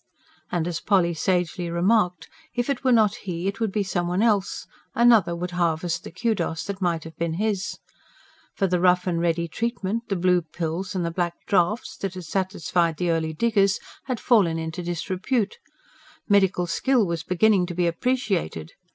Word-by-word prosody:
And 170 -2 0
as 170 -2 -2
Polly 180 -3 +2
sagely 175 +1 -1
remarked: 180 -1 +1 0.3
if 245 +3 0
it 250 - -3
were 260 - +3
not 215 -4 +4
he, 180 -5 -5
it 200 - -3
would 225 -3 0
be 210 0 0
some 175 -2 -1
one 180 +4 +1
else; 205 -4 +1 0.3
another 230 -8 +5
would 180 +1 -4
harvest 170 -1 -1
the - - -7
KUDOS 175 -3 -1
that 200 -1 -6
might 170 -3 0
have 160 0 -10
been 165 -1 -1
his. 200 0 -1 0.8
For 195 - +1
the 180 -1 +1
rough 180 0 +3
and 170 -2 0
ready 170 0 0
treatment 230 +3 -3
the 195 - 0
blue 180 0 +3
pills 170 +4 -4
and 180 - 0
black 175 -1 -3
draughts 200 +4 +1
that 195 -2 -4
had 180 -2 -7
satisfied 170 -2 0
the 175 0 0
early 160 -1 -1
diggers 200 +1 +2 0.3
had 255 -4 -2
fallen 195 -10 +3
into 160 +2 -4
disrepute; 185 - -2 0.7
medical 190 -3 +3
skill 230 +7 +2
was 170 -2 -2
beginning 180 +2 +2
to 175 - -6
be 175 0 +1
appreciated. 170 - -1
180 Hz, 175 wpm, -24 LUFS, 170-205 Hz, 0.8 s, another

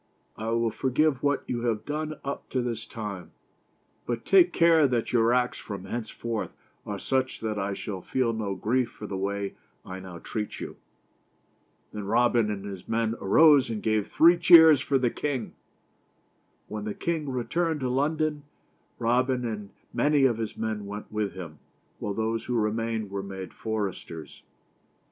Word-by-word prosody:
I 110 +1 -4
will 115 0 +1
forgive 135 +2 +1
what 145 0 +1
you 120 -1 -3
have 110 -2 -1
done 155 +1 -3
up 140 0 -5
to 130 -2 0
this 115 -2 -4
time, 100 -6 -6 0.7
but 120 -1 -3
take 180 -2 +6
care 165 -3 +5
that 120 -2 -1
your 115 -1 +4
acts 125 0 +1
from 100 -3 -7
hence 110 +2 -4
forth 115 -2 -3 0.4
are 100 - -3
such 130 +5 -1
that 110 -2 -2
I 100 +1 -1
shall 95 -3 -5
feel 125 +1 0
no 105 -3 -2
grief 125 +4 0
for 105 - -10
the 100 - -5
way 100 +1 -2 0.3
I 95 0 -7
now 95 -2 -9
treat 105 +4 -5
you." - - -6 1.2
Then 105 -1 -5
Robin 120 0 +3
and 100 -1 -4
his 95 -3 -8
men 115 0 0
arose 145 +6 +6
and 110 -2 -4
gave 110 -2 +1
three 170 +2 +6
cheers 160 -4 +8
for 140 - +1
the 125 -2 +1
king. 135 -6 -3 1.1
When 105 -1 -5
the 105 - -3
king 160 -4 -2
returned 155 +5 -1
to 130 - 0
London, 150 +3 0 0.6
Robin 125 +1 +1
and 105 -3 -4 0.2
many 145 -2 +3
of 120 -4 +2
his 110 -2 -4
men 110 -2 -3
went 105 +1 -7
with 105 -2 -2
him, 85 -5 -8 0.4
while 100 -1 -3
those 115 +1 -1
who 125 - -2
remained 110 -1 -1
were 100 0 -2
made 95 -2 -7
foresters. 100 -7 -5
115 Hz, 165 wpm, -27 LUFS, 105-130 Hz, 1.2 s, cheers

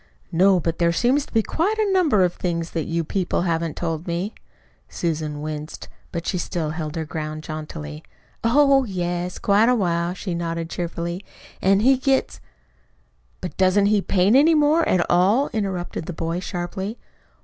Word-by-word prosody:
"No. 185 +2 +4
But 165 0 -2
there 170 -1 +3
seem 245 +10 +2
to 290 - -8
be 225 -2 +2
quite 390 - 0
a 420 -3 +1
number 305 - +4
of 175 -1 +1
things 170 -2 -3
that 165 -2 -2
you 165 0 -1
people 180 +1 -1
haven't 165 -3 -1
told 165 0 -3
me." 175 +5 -2 0.6
Susan 155 -3 -3
winced, 155 0 -6 0.2
but 170 -1 -4
she 180 - -1
still 165 -3 -2
held 155 -1 -4
her 160 -1 -2
ground 155 0 -5
jauntily. 80 - -7 0.4
"Oh, 275 +3 +5
yes, 180 -4 -3
quite 210 +3 +3
a 250 - +4
while," 175 -4 0
she 185 -1 -4
nodded 165 -1 -3
cheerfully. 170 +1 -4 0.4
"An' 195 +1 +4
he 265 +3 +5
gets 265 +1 0 0.5
" - - -40
"But - - -5
doesn't 190 +2 +4
he 205 - +3
paint 195 +4 +3
any 310 +4 +6
more 305 +2 +3
at 175 -2 +3
all?" 200 +11 +3
interrupted 190 -6 -3
the 180 - -4
boy 165 +2 -2
sharply. 190 +4 -4
175 Hz, 170 wpm, -23 LUFS, 165-210 Hz, 0.6 s, any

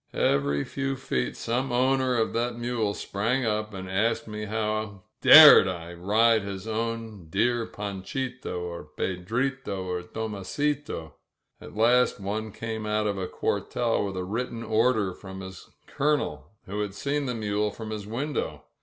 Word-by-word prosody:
Every 70 0 +2
few 135 0 -3
feet 65 - -2
some 125 +3 -1
owner 130 0 +2
of 110 - 0
that 120 +1 -1
mule 120 -4 -1
sprang 115 +6 -1
up 105 0 -1
and 95 -2 -7
asked 110 +6 0
me 105 0 -5
how 110 -2 -2 0.2
dared - - +10
I 85 -2 -5
ride 110 +6 +3
his 100 +1 -6
own 110 -4 -4
dear 120 +6 +1
Fanchito, 105 +2 -5
or 85 -2 -5
Pedrito, 95 - -3
or 90 -1 -2
Tomasito! 110 - -3 0.5
At - - -11
last 120 +1 +4
one 105 +2 -3
came 110 0 -5
out 105 0 0
of 100 -2 -1
a 95 - -2
cuartel 115 +4 -1
with 95 -2 -4
a 90 - -2
written 115 +4 -3
order 110 -4 +2
from 95 0 -9
his 95 -2 -10 0.2
Colonel, 150 +1 -1 0.2
who 100 +2 -3
had 100 -2 -4
seen 140 +3 -1
the 125 - -2
mule 105 -1 0
from 110 +1 -7
his 105 -2 -5
win 135 +7 -3
dow. - - -3
110 Hz, 155 wpm, -27 LUFS, 95-120 Hz, 0.5 s, dared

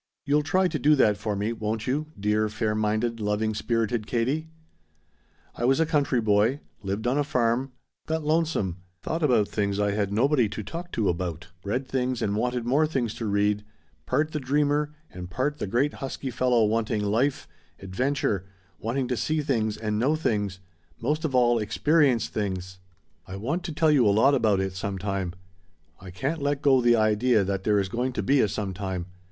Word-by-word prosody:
"You'll 145 +2 +3
try 185 +5 +2
to 160 -4 -3
do 150 +4 +5
that 105 -7 +4
for 105 +1 -3
me, 105 +3 -1
won't 110 0 -3
you, 145 +4 -1
dear 105 +1 +1
fair 105 0 -1
minded, 110 +2 0
loving 105 +1 0
spirited 115 0 -1
Katie? 135 +7 -1 1.0
"I - - -6
was 135 +4 +3
a 165 - +4
country 145 -5 +1
boy; 110 +5 +2 0.2
lived 100 +3 -3
on 130 +4 +2
a - - +3
farm, 125 0 0 0.3
got 160 0 -1
lonesome, 155 - 0 0.3
thought 165 - -2
about 120 -9 +3
things 100 -1 -1
I 105 0 +2
had 100 -1 -1
nobody 125 +1 +2
to 105 +1 -5
talk 175 - -7
to 110 -3 0
about, 85 -1 -3
read 125 +6 -2
things 130 -2 -1
and 100 0 0
wanted 125 +2 -1
more 145 +6 +3
things 125 -8 -1
to 115 - -4
read, 105 0 +1 0.4
part 155 +1 +1
the 150 - -2
dreamer 145 +2 +1 0.2
and 90 -1 -8
part 145 - -2
the - - -2
great 125 +9 +1
husky 135 -1 -5
fellow 120 -1 +2
wanting 110 -1 0
life, 120 +7 0 0.3
adventure, 100 -1 -1 0.3
wanting 125 +4 -1
to 125 - -1
see 155 +6 0
things 110 -6 0
and 105 -1 -2
know 140 +7 +2
things 105 - -1 0.4
most 150 +7 -1
of 135 -4 -1
all, 120 -1 +4
experience 135 +3 +2
things. 95 -3 -4 0.5
I 95 - -7
want 135 - -2
to - - -3
tell 155 0 +3
you 130 -7 +4
a - - +5
lot 110 +8 +4
about 110 -7 +3
it 95 -1 -2
sometime. 95 -1 -3 0.7
I 95 - -10
can't 140 - -3
let 145 0 -1
go 135 -3 +5
the 120 0 +5
idea 110 +1 +3
that 95 0 -3
there 105 -1 +3
is 95 - 0
going 125 +6 -2
to - - -2
be 135 0 +3
a - - +3
sometime. 95 -3 -4
115 Hz, 190 wpm, -26 LUFS, 105-140 Hz, 1.0 s, do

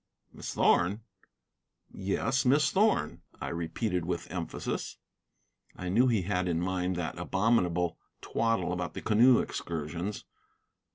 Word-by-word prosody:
"Miss - - -6
Thorn?" 95 +6 +3 0.9
"Yes, 100 +8 0
Miss 145 +4 +4
Thorn," 200 - +2 0.2
I - - -4
repeated 85 +3 -2
with 85 0 -4
emphasis. 85 -3 -4 0.8
I 90 - -5
knew 120 +8 +4
he 110 -6 +2
had 90 -1 0
in 85 -2 0
mind 90 0 -1
that 85 0 -4
abominable 90 -3 +1 0.2
twaddle 115 -6 0
about 90 0 -4
the - - -5
canoe 120 +4 +6
excursions. 85 +5 -4
90 Hz, 120 wpm, -30 LUFS, 85-115 Hz, 0.9 s, canoe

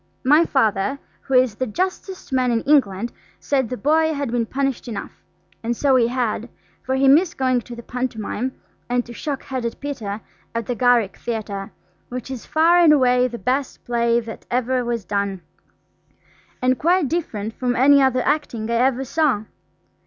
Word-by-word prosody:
My 300 +6 +5
Father, 225 -1 +1 0.2
who 270 - -2
is 255 -3 +4
the 255 +5 -3
justest 370 - -4
man 255 -1 +2
in 230 -1 +1
England, 235 -7 +2 0.3
said 265 -5 0
the 250 - -4
boy 315 +3 +2
had 280 -4 -3
been 235 -2 0
punished 270 -1 -2
enough–and 180 +1 -7
so 275 -2 +3
he 240 -2 +4
had, 240 -2 -2 0.3
for 260 - -2
he 270 +1 +3
missed 325 +6 +4
going 255 -2 +1
to 240 0 -10
the 235 - -9
pantomime, 250 0 -3 0.4
and 245 0 +1
to 240 - -10
"Shock 280 +2 -4
Headed 250 -3 -4
Peter" 230 -8 -4 0.4
at 230 -1 -1
the 245 - -2
Garrick 240 -4 +2
Theatre, 210 -4 -4 0.4
which 250 +1 -6
is 255 -3 -7
far 335 +3 +4
and 335 -3 +6
away 250 -3 +4
the 240 -1 -6
best 260 +3 -2
play 235 -1 +2
that 225 -1 -10
ever 250 +1 0
was 235 -4 -3
done, 200 -1 -2 1.2
and 255 0 +2
quite 345 -1 +3
different 225 -10 -3
from 245 0 -1
any 280 +2 +6
other 255 -1 +2
acting 240 -7 -1
I 235 - +2
ever 260 +1 +2
saw. 280 -7 +1
250 Hz, 170 wpm, -21 LUFS, 230-275 Hz, 1.2 s, and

